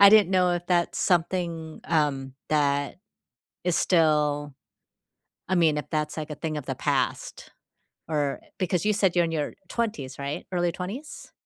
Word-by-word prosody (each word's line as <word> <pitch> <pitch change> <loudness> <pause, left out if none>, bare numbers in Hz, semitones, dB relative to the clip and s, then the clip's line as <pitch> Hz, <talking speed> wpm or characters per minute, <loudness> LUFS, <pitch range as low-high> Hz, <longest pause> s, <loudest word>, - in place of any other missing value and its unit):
I 200 - +11
didn't 210 -4 +6
know 180 -1 +3
if 175 0 -3
that's 175 -2 +1
something, 170 -3 0
um, 140 -5 0
that 145 -2 +1 0.7
is 180 -1 +2
still 150 -4 +2 1.0
I 185 - +2
mean, 160 -4 +4
if 150 - -3
that's, 150 0 -2
like, 155 0 -4
a 150 - -5
thing 155 -1 -3
of 145 - -5
the - - -3
past, - - -2 0.6
or, 145 -3 0
eh - - -23
because 180 -2 0
you 215 - +4
said 190 -3 +2
you're 175 - +5
in 165 - -2
your 150 -3 -2
20s, 180 - -3
right? 140 +1 -4
Early 175 -1 +1
20s? 215 +12 -7
165 Hz, 170 wpm, -26 LUFS, 150-180 Hz, 1.0 s, I